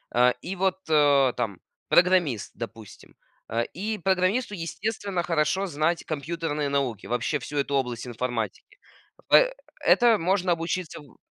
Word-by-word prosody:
э, 125 Hz, +1 st, +5 dB
и 190 Hz, +3 st, -5 dB
вот, 190 Hz, 0 st, +1 dB
э, 145 Hz, -4 st, +4 dB
там 100 Hz, -5 st, -3 dB, 0.3 s
программист, 175 Hz, -, +3 dB
допустим, 115 Hz, -3 st, -10 dB, 0.3 s
а, 115 Hz, +1 st, 0 dB
и 210 Hz, -, -4 dB
программисту 190 Hz, +5 st, +1 dB
естественно 195 Hz, +1 st, -3 dB
хорошо 175 Hz, +3 st, +1 dB
знать 160 Hz, +2 st, 0 dB
компьютерные 150 Hz, -1 st, -3 dB
науки, 130 Hz, -7 st, -2 dB
вообще 120 Hz, +5 st, -1 dB
всю 145 Hz, +4 st, -6 dB
эту 140 Hz, 0 st, 0 dB
область 125 Hz, -3 st, -1 dB
информатики. 120 Hz, -, -4 dB, 0.5 s
Пэ -, -, +6 dB, 0.3 s
это 235 Hz, -3 st, +5 dB
можно 185 Hz, +1 st, +1 dB
обучиться 165 Hz, 0 st, -3 dB
у 140 Hz, -5 st, -19 dB
160 Hz, 135 wpm, -26 LUFS, 130-185 Hz, 0.5 s, Пэ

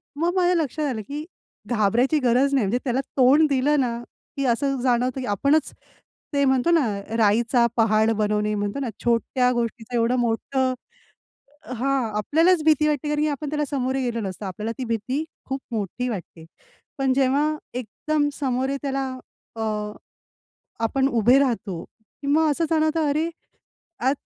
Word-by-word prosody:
मग 335 Hz, +4 st, 0 dB
माझ्या 360 Hz, -1 st, +3 dB
लक्षात 300 Hz, +2 st, -3 dB
आलं 220 Hz, -4 st, -3 dB
की 295 Hz, +2 st, -5 dB, 0.4 s
घाबरायची 240 Hz, +6 st, +2 dB
गरज 255 Hz, +2 st, +2 dB
नाही. 255 Hz, -7 st, +3 dB
म्हणजे 245 Hz, +5 st, 0 dB
त्याला 255 Hz, +1 st, +1 dB, 0.2 s
तोंड 275 Hz, +5 st, +6 dB
दिलंना 260 Hz, -3 st, +1 dB, 0.3 s
की 275 Hz, -, 0 dB
असं 270 Hz, +2 st, 0 dB
जाणवतं 250 Hz, +1 st, +1 dB
की -, -, -4 dB
आपणच 280 Hz, +9 st, +2 dB, 0.6 s
ते 280 Hz, 0 st, +2 dB
म्हणतो 265 Hz, +5 st, +2 dB
ना 325 Hz, -6 st, +4 dB, 0.3 s
राईचा 235 Hz, +3 st, +3 dB
पहाड 220 Hz, 0 st, +3 dB
बनवणे 210 Hz, -1 st, 0 dB
म्हणतो 205 Hz, +5 st, -2 dB
ना 260 Hz, -, -2 dB
छोट्या 250 Hz, +2 st, +2 dB
गोष्टीचं 230 Hz, 0 st, -3 dB
एवढं 235 Hz, +2 st, +2 dB
मोठं 255 Hz, +3 st, 0 dB, 1.0 s
हां, 260 Hz, -1 st, 0 dB
आपल्यालाच 325 Hz, -, +3 dB
भीती 305 Hz, -1 st, +4 dB
वाटते 295 Hz, -1 st, -1 dB
कारण 300 Hz, 0 st, 0 dB
की 305 Hz, -, +2 dB
आपण 290 Hz, 0 st, -4 dB
त्याला 295 Hz, 0 st, -1 dB
समोरे 265 Hz, -1 st, -1 dB
गेलो 235 Hz, -2 st, -2 dB
नसतो, 190 Hz, +2 st, -6 dB
आपल्याला 210 Hz, +4 st, -4 dB
ती 260 Hz, -, -3 dB
भीती 250 Hz, +7 st, -1 dB, 0.2 s
खूप 270 Hz, 0 st, -4 dB
मोठी 225 Hz, +3 st, -3 dB
वाटते. 175 Hz, -6 st, -7 dB, 0.5 s
पण 270 Hz, -1 st, +2 dB
जेव्हा 275 Hz, +2 st, +2 dB, 0.4 s
एकदम 290 Hz, +5 st, -1 dB
समोरे 265 Hz, 0 st, 0 dB
त्याला 275 Hz, -1 st, -1 dB, 0.5 s
अ, -, -, -3 dB, 1.2 s
आपण 265 Hz, +4 st, +1 dB
उभे 240 Hz, +1 st, +4 dB
राहतो, 225 Hz, -10 st, -1 dB
की 220 Hz, +6 st, -15 dB
मग 310 Hz, +2 st, +3 dB
असं 315 Hz, +3 st, 0 dB
जाणवतं, 315 Hz, -1 st, +2 dB
अरे, 310 Hz, +3 st, 0 dB, 0.7 s
आज 265 Hz, +3 st, +2 dB
260 Hz, 150 wpm, -23 LUFS, 230-290 Hz, 1.2 s, तोंड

